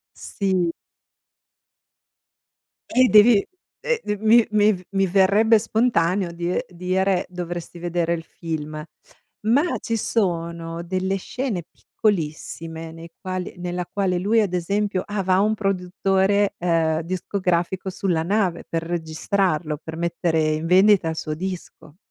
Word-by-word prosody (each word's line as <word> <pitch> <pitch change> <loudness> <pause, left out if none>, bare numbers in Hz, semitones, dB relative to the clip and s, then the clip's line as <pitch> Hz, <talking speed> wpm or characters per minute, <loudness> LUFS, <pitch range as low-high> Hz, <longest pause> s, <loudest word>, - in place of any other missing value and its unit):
Sì. 185 -4 -1 2.2
Eh 255 0 +4
devi, 215 +1 +7 0.4
ehm, 485 -1 +1
dev 210 0 -3
mi 225 +1 +6
mi 215 0 +4
v 180 0 -8
mi 195 -1 +2
verrebbe 200 +4 +4
spontaneo 190 -6 +1
die 170 +1 -2
dire: 185 +1 0
"Dovresti 175 -1 -6
vedere 170 -1 -1
il 165 -1 -4
film". 155 -2 -6 0.6
Ma, 280 +10 +2
ci 230 - -2
sono 170 -5 -2
delle 185 +2 -1
scene 210 -1 -3
piccolissime, 165 -3 -3
nei 165 0 -11
quali 185 -1 -4
nella 175 0 -3
quale 190 -3 0
lui, 215 +5 +2
ad 195 -4 -1
esempio 200 +2 0
ah, 205 -1 -3
va 185 0 +3
un 215 +2 +2
produttore, 195 0 +1
ehm, 165 -2 +1
discografico 185 +1 -1
sulla 180 -3 -1
nave. 185 -2 0
Per 165 0 -2
registrarlo, 165 -1 -1
per 160 0 -7
mettere 170 -1 0
in 155 +2 -2
vendita 190 0 +5
il 160 - -3
suo 155 -1 -3
disco. 175 -3 -7
180 Hz, 130 wpm, -23 LUFS, 170-200 Hz, 2.2 s, devi